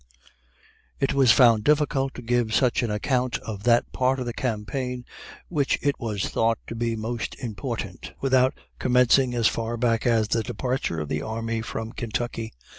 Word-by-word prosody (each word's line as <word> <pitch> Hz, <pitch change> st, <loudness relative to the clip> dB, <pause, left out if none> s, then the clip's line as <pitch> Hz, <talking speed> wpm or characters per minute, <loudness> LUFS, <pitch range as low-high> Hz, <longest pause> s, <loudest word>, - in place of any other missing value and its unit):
It 135 Hz, -, +1 dB
was 135 Hz, -4 st, +5 dB
found 115 Hz, -3 st, +5 dB
difficult 145 Hz, -2 st, +2 dB
to 125 Hz, -, -8 dB
give 120 Hz, -2 st, +1 dB
such 125 Hz, -3 st, +3 dB
an 120 Hz, -, -1 dB
account 125 Hz, +4 st, 0 dB
of 105 Hz, -3 st, -7 dB
that 120 Hz, 0 st, +3 dB
part 130 Hz, +1 st, +1 dB
of 125 Hz, -, -3 dB
the 120 Hz, -, -3 dB
campaign 125 Hz, +2 st, -3 dB, 0.4 s
which 145 Hz, -5 st, +1 dB
it 145 Hz, -1 st, 0 dB
was 105 Hz, -4 st, -2 dB
thought 115 Hz, 0 st, +1 dB
to -, -, -6 dB
be 115 Hz, 0 st, -1 dB
most 115 Hz, +1 st, -4 dB
important, 110 Hz, -6 st, -5 dB
without 130 Hz, -1 st, +3 dB, 0.2 s
commencing 125 Hz, 0 st, +4 dB
as 115 Hz, -2 st, +3 dB
far 115 Hz, +1 st, -2 dB
back 115 Hz, 0 st, +1 dB
as 110 Hz, -3 st, +2 dB
the 115 Hz, -, +2 dB
departure 115 Hz, -5 st, -2 dB
of 75 Hz, -, -4 dB
the 75 Hz, +1 st, -2 dB
army 115 Hz, +2 st, -3 dB
from 115 Hz, 0 st, -5 dB
Kentucky. 115 Hz, -1 st, -4 dB
120 Hz, 170 wpm, -25 LUFS, 110-130 Hz, 0.4 s, was